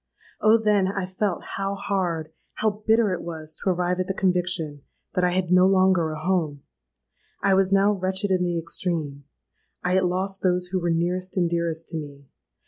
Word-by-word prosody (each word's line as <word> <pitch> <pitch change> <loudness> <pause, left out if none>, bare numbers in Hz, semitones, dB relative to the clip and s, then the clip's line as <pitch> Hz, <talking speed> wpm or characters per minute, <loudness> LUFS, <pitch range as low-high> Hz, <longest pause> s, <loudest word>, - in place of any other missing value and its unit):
Oh! 215 +1 +6
then 210 -3 +2
I 195 -1 -2
felt 185 0 -2
how 195 0 -2
hard, 180 -5 -2 0.2
how 215 -1 -1
bitter 220 -3 +4
it 180 - -4
was 160 -2 -7
to 190 - -3
arrive 180 0 0
at 185 - -1
the 195 - -2
conviction 180 -6 0 0.3
that 180 - 0
I 180 - +4
had 180 0 -1
no 180 +1 +6
longer 185 -3 +3
a 155 0 -5
home! 155 -5 -1 0.8
I 195 - +4
was 190 0 +3
now 195 +1 +4
wretched 190 +1 -1
in 185 -1 +2
the 175 -1 0
extreme: 160 -4 -3 0.6
I 180 - +1
had 190 0 +3
lost 190 +2 -1
those 180 -1 +1
who 190 - 0
were 170 - 0
nearest 180 +3 -1
and 175 -2 +3
dearest 170 -1 -2
to 165 - -4
me! 140 -2 -8
180 Hz, 190 wpm, -24 LUFS, 170-190 Hz, 0.8 s, Oh